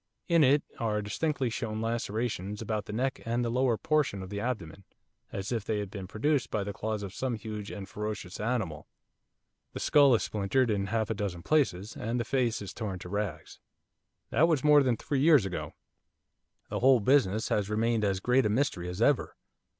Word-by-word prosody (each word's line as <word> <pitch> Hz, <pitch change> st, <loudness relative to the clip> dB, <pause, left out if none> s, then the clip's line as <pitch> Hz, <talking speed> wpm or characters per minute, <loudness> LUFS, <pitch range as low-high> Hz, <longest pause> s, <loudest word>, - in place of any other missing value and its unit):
In 170 Hz, -3 st, +5 dB
it 140 Hz, +2 st, +4 dB, 0.2 s
are 105 Hz, -2 st, 0 dB
distinctly 130 Hz, +3 st, -1 dB
shown 110 Hz, -2 st, -3 dB
lacerations 110 Hz, -3 st, -2 dB
about 110 Hz, -1 st, -3 dB
the -, -, -7 dB
neck 130 Hz, +5 st, -1 dB
and 120 Hz, +1 st, -1 dB
the 115 Hz, -, -1 dB
lower 125 Hz, -2 st, +2 dB
portion 145 Hz, -11 st, 0 dB
of 95 Hz, -, -9 dB
the 100 Hz, -, -3 dB
abdomen, 100 Hz, -6 st, -4 dB, 0.5 s
as 100 Hz, +3 st, -4 dB
if 115 Hz, -4 st, -1 dB
they 110 Hz, 0 st, -1 dB
had 100 Hz, -2 st, -4 dB
been 100 Hz, -3 st, -6 dB
produced 120 Hz, +5 st, 0 dB
by 105 Hz, -, -1 dB
the 100 Hz, +1 st, -5 dB
claws 110 Hz, 0 st, -3 dB
of 100 Hz, -1 st, -6 dB
some 130 Hz, +1 st, -2 dB
huge 105 Hz, -2 st, -6 dB
and 100 Hz, -2 st, -7 dB
ferocious 105 Hz, -2 st, -5 dB
animal. 105 Hz, -9 st, -2 dB, 0.9 s
The -, -, -5 dB
skull 140 Hz, -4 st, +5 dB
is -, -, 0 dB
splintered 110 Hz, +4 st, +1 dB
in 100 Hz, -1 st, 0 dB
half 110 Hz, +1 st, -1 dB
a -, -, +2 dB
dozen 95 Hz, -5 st, -4 dB
places, 105 Hz, -10 st, +1 dB
and 115 Hz, +3 st, -2 dB
the 120 Hz, -, -1 dB
face 120 Hz, -4 st, 0 dB
is 100 Hz, -, -7 dB
torn 105 Hz, -5 st, -4 dB
to 90 Hz, -, -9 dB
rags. 100 Hz, -6 st, -4 dB, 0.7 s
That 165 Hz, -, +4 dB
was 155 Hz, -5 st, +1 dB
more 150 Hz, -1 st, +7 dB
than 125 Hz, -4 st, +1 dB
three 140 Hz, +4 st, -2 dB
years 150 Hz, -8 st, +6 dB
ago. 95 Hz, -2 st, -5 dB, 1.0 s
The -, -, -1 dB
whole 130 Hz, 0 st, +6 dB
business 110 Hz, -3 st, +2 dB
has 105 Hz, -1 st, 0 dB
remained 110 Hz, +1 st, +1 dB
as 100 Hz, -2 st, +1 dB
great 125 Hz, +3 st, +3 dB
a -, -, -1 dB
mystery 105 Hz, -, 0 dB
as 90 Hz, +6 st, -1 dB
ever. 145 Hz, 0 st, +2 dB
110 Hz, 195 wpm, -29 LUFS, 100-125 Hz, 1.0 s, more